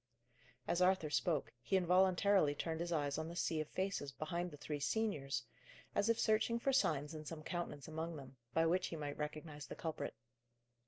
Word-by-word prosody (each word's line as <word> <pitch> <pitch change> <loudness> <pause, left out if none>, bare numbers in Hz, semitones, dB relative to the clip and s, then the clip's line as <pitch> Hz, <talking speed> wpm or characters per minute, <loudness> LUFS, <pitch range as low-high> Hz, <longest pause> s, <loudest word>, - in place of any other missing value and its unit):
As 175 - +1
Arthur 180 -4 +3
spoke, 155 -1 +1
he 195 - +2
involuntarily 185 -2 +4
turned 160 +2 -2
his 170 +1 -2
eyes 145 -2 0
on 160 - -3
the 170 - -6
sea 165 -2 +1
of 155 - -4
faces 185 -7 -2
behind 170 +6 -2
the 145 - -10
three 150 0 -4
seniors, 140 - 0 0.5
as 205 +2 +2
if 230 - +3
searching 220 +2 +3
for 270 +3 +1
signs 150 - +2
in 155 -1 -6
some 155 0 -6
countenance 170 -5 -4
among 160 +1 -3
them, 135 -2 -9 0.2
by 165 +5 +3
which 180 +3 +2
he - - -5
might 145 -2 -4
recognize 150 -1 -5
the - - -6
culprit. 160 -2 -4
165 Hz, 190 wpm, -38 LUFS, 150-185 Hz, 0.5 s, involuntarily